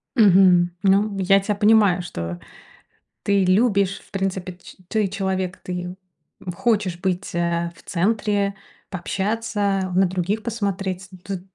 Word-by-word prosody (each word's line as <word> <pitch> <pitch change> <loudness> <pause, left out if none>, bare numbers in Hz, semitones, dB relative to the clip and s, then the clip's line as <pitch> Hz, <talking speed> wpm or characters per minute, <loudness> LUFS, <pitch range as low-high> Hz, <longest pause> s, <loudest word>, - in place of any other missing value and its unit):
Мгм. 185 -5 +5
Ну, 200 +1 +3
я 195 +1 +4
тя 205 +1 -2
понимаю, 205 -4 +4
что 85 - -6 0.8
ты 200 -2 +2
любишь, 200 0 +2
в - - -23
принципе, 190 -2 -3
ч - - -13
ты 215 -2 0
человек, 190 -2 -2
ты, 180 0 -5 0.5
м, 180 - -5
хочешь 205 -4 0
быть, 185 -1 -2
э, 170 0 0
в - - -18
центре, 200 +1 0 0.3
пообщаться, 200 0 -1
на 190 +1 +5
других 190 +4 -2
посмотреть. 195 -4 -3
Тут 195 -3 -5
195 Hz, 130 wpm, -22 LUFS, 180-205 Hz, 0.8 s, Мгм